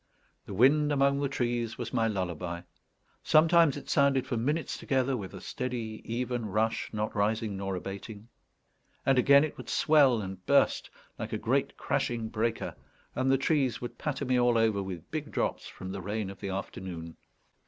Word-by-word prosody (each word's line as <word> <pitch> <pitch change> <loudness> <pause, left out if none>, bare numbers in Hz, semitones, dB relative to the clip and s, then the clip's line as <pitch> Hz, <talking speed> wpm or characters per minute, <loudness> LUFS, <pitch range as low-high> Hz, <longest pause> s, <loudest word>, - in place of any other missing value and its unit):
The 100 - -6
wind 145 +7 +4
among 140 0 +3
the 140 -1 0
trees 120 -3 -1
was 120 -2 -5
my 115 -2 +2
lullaby. 90 -4 -3 0.6
Sometimes 165 -2 +5
it 145 - -9
sounded 140 -2 +3
for - - -2
minutes 145 +8 -1
together 135 -1 0
with 100 -6 -6
a - - -7
steady, 120 -4 -4
even 120 0 -2
rush, 110 +3 0
not 110 0 -3
rising 105 0 0
nor 95 0 -3
abating; 100 +4 -7 0.8
and 135 -1 +4
again 140 +3 +6
it 155 - -4
would - - -9
swell 140 -6 +4
and 95 -2 -6
burst - - +3 0.3
like - - -5
a - - 0
great - - 0
crashing 115 -2 -1
breaker, 115 +1 -1 0.4
and 130 +1 +1
the 135 - +4
trees 135 -4 +1
would 120 - -7
patter 145 -2 -2
me 125 -1 +2
all 120 -1 +3
over 110 -3 +2
with 95 -3 -7
big 155 -2 -3
drops - - -2
from 95 0 -8
the 100 0 -5
rain 100 +1 -3
of 95 - -12
the 100 - -4
afternoon. 95 -3 -6
115 Hz, 175 wpm, -29 LUFS, 100-135 Hz, 0.8 s, again